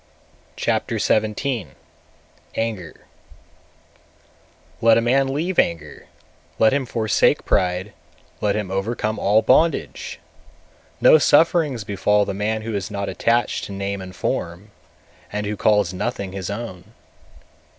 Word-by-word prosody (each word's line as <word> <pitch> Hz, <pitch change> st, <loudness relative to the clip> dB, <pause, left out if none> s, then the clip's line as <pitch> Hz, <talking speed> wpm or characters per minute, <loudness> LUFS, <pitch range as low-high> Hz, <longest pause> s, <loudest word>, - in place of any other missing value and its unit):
Chapter -, -, -1 dB
XVII. 110 Hz, -, -1 dB, 0.8 s
Anger 110 Hz, -7 st, -3 dB
221. -, -, -25 dB, 1.8 s
Let 115 Hz, 0 st, +6 dB
a -, -, +5 dB
man 135 Hz, +3 st, +2 dB
leave 170 Hz, +6 st, -1 dB
anger, 75 Hz, -4 st, -1 dB, 0.5 s
let 110 Hz, +3 st, +4 dB
him 140 Hz, -2 st, -1 dB
forsake 110 Hz, -2 st, +1 dB
pride, 90 Hz, +2 st, 0 dB, 0.5 s
let 105 Hz, -1 st, +1 dB
him 105 Hz, -3 st, -3 dB
overcome 110 Hz, +2 st, -2 dB
all 105 Hz, +3 st, +3 dB
bondage! 155 Hz, +7 st, +1 dB, 0.8 s
No 155 Hz, -, +7 dB
sufferings 150 Hz, -5 st, +3 dB
befall 105 Hz, +1 st, +1 dB
the -, -, -3 dB
man 110 Hz, +2 st, -2 dB
who 115 Hz, 0 st, -4 dB
is 100 Hz, +1 st, -3 dB
not 100 Hz, -1 st, -3 dB
attached 115 Hz, -1 st, 0 dB
to -, -, -9 dB
name 100 Hz, 0 st, -3 dB
and 95 Hz, 0 st, -9 dB
form, 90 Hz, +5 st, -4 dB, 0.6 s
and 105 Hz, 0 st, -3 dB
who 105 Hz, +1 st, -2 dB
calls 105 Hz, -3 st, +2 dB
nothing 95 Hz, 0 st, -3 dB
his 95 Hz, -1 st, -5 dB
own. 105 Hz, -1 st, -7 dB
105 Hz, 125 wpm, -21 LUFS, 95-115 Hz, 1.8 s, No